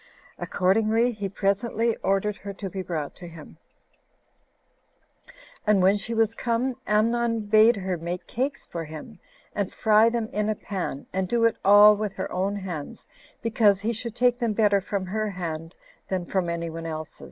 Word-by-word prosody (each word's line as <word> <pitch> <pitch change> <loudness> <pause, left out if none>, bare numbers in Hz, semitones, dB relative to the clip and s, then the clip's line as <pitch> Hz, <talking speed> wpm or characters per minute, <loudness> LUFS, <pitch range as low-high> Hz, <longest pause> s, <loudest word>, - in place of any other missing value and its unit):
Accordingly, 220 +5 +2
he 205 -4 -4
presently 220 +4 0
ordered 195 +1 0
her 200 0 -7
to 195 -1 -6
be 190 - -4
brought 160 -5 -4
to 175 - -9
him; 165 -2 -12 2.1
and 210 -2 +5
when 190 +2 +5
she 225 +3 -4
was 225 -1 +2
come, 240 +2 -1
Amnon 230 +2 +2
bade 215 +3 +5
her 190 -2 -3
make 175 +2 -5
cakes 275 +4 -3
for 170 -1 -5
him, 160 +7 -10 0.3
and 200 -2 -2
fry 220 +1 +4
them 230 -2 -2
in 210 +1 0
a 215 - 0
pan, 185 -9 -5
and 190 0 -1
do 230 +3 +2
it 230 - +3
all 205 +1 +8
with 205 -1 -3
her 190 - -5
own 195 +2 -1
hands, 180 -7 -6 0.4
because 210 -3 +3
he 225 +3 -1
should 225 0 -6
take 245 0 +2
them 235 -4 0
better 205 -2 +3
from 195 0 -3
her 215 +3 -2
hand 165 -3 -6 0.3
[than 185 -2 -2
from 180 -1 -1
any 170 -1 -3
one's 165 0 -6
else]. 155 -1 -6
205 Hz, 175 wpm, -25 LUFS, 185-225 Hz, 2.1 s, all